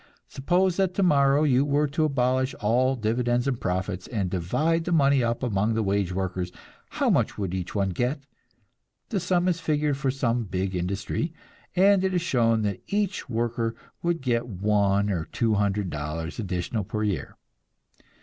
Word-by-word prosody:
Suppose 175 +6 +1
that 190 -2 +1
tomorrow 145 -6 +4
you 135 -3 +4
were 145 +1 +2
to 155 +3 +1
abolish 130 -2 +1
all 125 +5 +2
dividends 120 +2 0
and 125 -4 -1
profits, 95 0 -2
and 100 -7 -2
divide 155 - 0
the 180 - -2
money 140 -5 +4
up 115 +2 -1
among 110 -1 +1
the 110 - +1
wage 100 -2 0
workers, 90 -1 -3 0.4
how - - +1
much - - +1
would 95 -3 -3
each 95 +1 -4
one 100 -1 +1
get? 125 - -1 0.9
The 210 - 0
sum 180 0 +1
is 175 -2 +1
figured 150 -3 0
for 135 -1 -1
some 120 -3 0
big 95 0 -2
industry, 100 - -2 0.4
and 195 +1 +5
it 190 -1 0
is 175 - +2
shown 115 -8 +2
that 100 -2 -2
each 200 -7 -1
worker 115 -1 -1 0.3
would 170 -1 0
get 120 -2 0
one 100 0 +1
or 85 -4 -2
two 115 +5 0
hundred 100 -2 0
dollars 75 +4 -4
additional 100 +2 -2
per 105 +3 -3
year. 100 -8 -3
120 Hz, 170 wpm, -26 LUFS, 100-145 Hz, 0.9 s, and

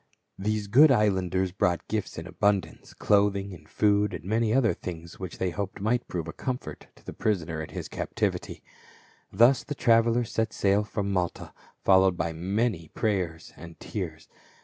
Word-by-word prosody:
These 105 +1 -1
good 135 +10 +6
islanders 95 -6 +2
brought 90 -1 0
gifts 110 -2 -3
in 80 - -6
abundance, 100 -3 -1
clothing 100 -1 +2
and 75 -3 -14
food, 105 -1 +2
and - - -8
many 110 +2 +1
other 120 -2 +3
things 85 -1 -8
which 95 -2 -6
they 95 - -1
hoped 100 +1 -5
might 115 +5 0
prove 85 -2 -4
a 80 - -6
comfort 130 -1 -5
to - - -22
the - - -7
pri 110 - +1
soner 80 -3 -5
in 80 - -7
his - - -6
captivity. - - -3 0.7
Thus 120 +7 +5
the 145 - -5
travelers 115 -1 +3
set 110 -1 -1
sail 100 +1 +2
from 100 -1 -3
Malta, 90 -2 -2 0.3
followed 95 -1 +5
by 80 0 -2
many 95 +1 -1
prayers 90 -7 -2
and 85 +1 -12
tears. 85 -7 -6
100 Hz, 170 wpm, -27 LUFS, 90-110 Hz, 0.7 s, good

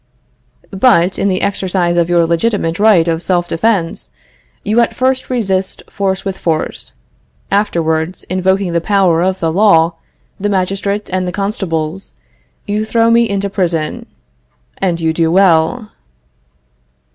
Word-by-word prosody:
But, 190 -3 +2
in - - +1
the 185 -1 0
exercise 185 -3 0
of 170 0 +1
your 170 -1 +3
legitimate 170 0 -1
right 205 -6 +4
of 165 0 -1
self 175 -1 0
defense, 175 -2 -1 0.5
you 215 +3 +1
at 235 - +1
first 260 0 0
resist 195 -6 -2
force 195 -1 -2
with 195 -1 -4
force; 160 -2 -3 0.6
afterwards, 170 -4 0
invoking 185 0 0
the 170 - +1
power 185 -3 +2
of 190 +1 0
the 165 -1 -1
law, 170 -4 +4 0.5
the 205 +1 -1
magistrate, 200 +2 -1
and 185 -1 -1
the - - -2
constables, 190 -4 -3 0.5
you 210 +1 -1
throw 230 +1 +2
me 235 0 +3
into 200 0 -1
prison 175 -6 -2 0.7
and 175 -3 0
you 160 -1 0
do 165 0 +1
well. 190 +5 +2
190 Hz, 135 wpm, -15 LUFS, 170-200 Hz, 0.7 s, right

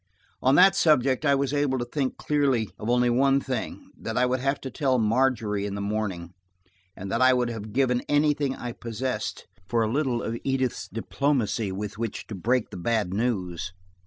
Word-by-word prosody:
On 130 +2 +4
that 190 +3 +7
subject 150 -6 +3
I 140 - +5
was 140 0 -1
able 145 -2 +1
to 120 - -2
think 130 +1 -2
clearly 135 -7 +1
of 110 - -4
only 125 0 +3
one 135 +3 +3
thing: 130 -4 -5
that - - -5
I 125 - +4
would 125 +1 0
have 135 +2 0
to 130 - -6
tell 135 -4 +1
Margery 110 -3 +1
in 100 - -4
the - - -4
morning, 100 -4 -3 0.6
and 95 +1 -7
that 115 - 0
I 130 0 +6
would 125 -1 +1
have 110 -2 -7
given 125 0 +2
anything 145 -2 +2
I 120 - -5
possessed 115 0 -4 0.2
for 115 +1 +1
a 110 - -1
little 130 -3 0
of 115 +1 -3
Edith's 130 -2 -1
diplomacy 115 -3 -1
with 105 +2 -5
which 115 -2 -4
to - - -8
break 115 +5 0
the - - -7
bad 105 -1 0
news. 95 -5 -2
125 Hz, 190 wpm, -26 LUFS, 110-135 Hz, 0.6 s, that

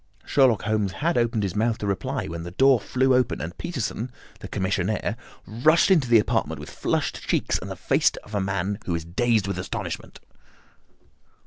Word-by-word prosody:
Sherlock 130 -6 +3
Holmes 105 -3 0
had 170 +3 0
opened 120 -2 +1
his 95 -3 -2
mouth 115 +1 +1
to - - -5
reply, 100 -3 -2
when 85 +1 -5
the 85 - -6
door 130 +7 +4
flew 130 +4 +1
open, 125 0 +2
and 85 +2 -5
Peterson, 125 -5 -3 0.3
the - - -8
commissionaire, 100 +3 -1 0.3
rushed 155 - +3
into 150 -10 +4
the 115 - +7
apartment 105 -9 0
with 75 - -9
flushed - - -1
cheeks - - +1
and - - -7
the - - -5
face - - +2
of 105 - -14
a 100 - 0
man 95 +1 -2
who 85 - 0
is 85 -1 -4
dazed 110 +4 +1
with 100 -2 -3
astonishment. 90 - -5
105 Hz, 185 wpm, -25 LUFS, 95-125 Hz, 0.3 s, the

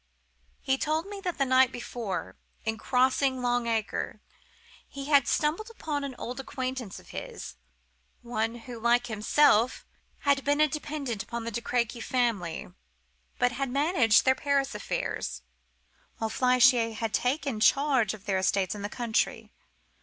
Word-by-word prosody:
He 265 0 0
told 310 +2 0
me 400 0 -7
that 360 -3 -3
the 275 - +2
night 260 -1 +4
before, 235 -5 -5 0.3
in 220 -1 -2
crossing 260 0 +2
Long 245 -1 +1
Acre, 225 -2 -2 0.7
he 275 -1 -7
had 285 -2 +4
stumbled 325 +9 0
upon 300 -10 -4
an 275 -2 -5
old 250 +2 -5
acquaintance 255 -5 -4
of - - -18
his; - - -7 0.7
one 230 -1 -2
who, 245 -2 -7
like 240 +1 +3
himself 230 +2 +3 0.4
had 280 -1 +2
been 290 +1 +1
a 305 - +6
dependent 285 -7 -4
upon 235 +3 -5
the 230 - -4
De 235 - -3
Crequy 235 0 -1
family, 220 -10 -1 0.6
but 245 0 +2
had 270 +2 -2
managed 270 - +3
their 260 - +6
Paris 280 -2 0
affairs, 65 - -3 0.7
while 225 -1 -2
Flechier 250 -2 +4
had 225 0 -3
taken 265 -2 0
charge 260 -4 +3
of 205 -1 -17
their 190 -3 +1
estates 190 0 +1
in 205 - -7
the 205 - -3
country. 235 -2 -1
245 Hz, 150 wpm, -28 LUFS, 225-275 Hz, 0.7 s, a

